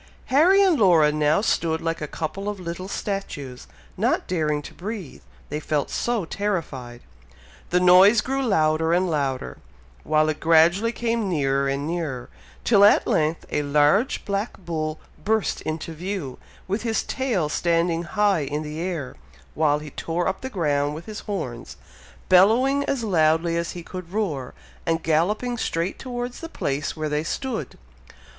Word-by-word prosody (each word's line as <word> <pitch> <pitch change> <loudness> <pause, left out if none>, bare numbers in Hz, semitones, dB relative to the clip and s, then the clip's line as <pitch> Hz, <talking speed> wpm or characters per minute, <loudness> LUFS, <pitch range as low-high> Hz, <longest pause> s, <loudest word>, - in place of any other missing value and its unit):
Harry 370 +8 +6
and 365 -6 +3
Laura 165 -7 +5
now 150 +3 +2
stood 165 -6 0
like 165 0 -3
a 150 - -3
couple 185 +7 -4
of 205 -2 -5
little 180 +1 -5
statues, 170 -11 -5 0.3
not - - +1
daring 155 -4 -1
to - - -10
breathe, 195 - -7 0.3
they 150 - -3
felt 150 -2 -2
so 235 -6 -1
terrified! 155 -12 -4 0.7
The 180 - +3
noise 185 +5 +7
grew 270 +1 -2
louder 160 -8 +2
and 185 +2 +2
louder, 135 -4 -2 0.4
while 155 0 +2
it 155 - -2
gradually 170 +7 +4
came 230 -3 -1
nearer 140 -4 +1
and 140 +1 -1
nearer, 155 -7 -3 0.3
till 205 -4 +5
at 205 - +6
length 155 +1 0
a - - +1
large 150 - +2
black 200 +3 -2
bull 155 -3 -4 0.2
burst 220 0 0
into 160 +1 -4
view, 175 -5 -5 0.3
with 200 +4 -1
his 225 -2 0
tail 235 - -1
standing 170 +1 +1
high 200 0 +1
in 150 +3 -3
the 150 +1 -6
air, 170 -6 -4 0.4
while 150 -2 +2
he 150 -1 -9
tore 170 +5 -2
up 190 - -2
the 260 - -4
ground 145 - 0
with 165 +2 -8
his 215 -1 -7
horns, 125 - -5 0.5
bellowing 235 +10 +5
as 265 -4 -1
loudly 165 -3 +2
as 170 0 -2
he 175 - -7
could 185 -1 -8
roar, 165 -12 -2 0.3
and 165 -1 -1
galloping 210 +10 0
straight 170 -1 -2
towards 245 -1 -5
the 330 - -7
place 140 - -3
where 155 0 -2
they 150 0 -1
stood. 220 - -4
170 Hz, 160 wpm, -24 LUFS, 155-205 Hz, 0.7 s, noise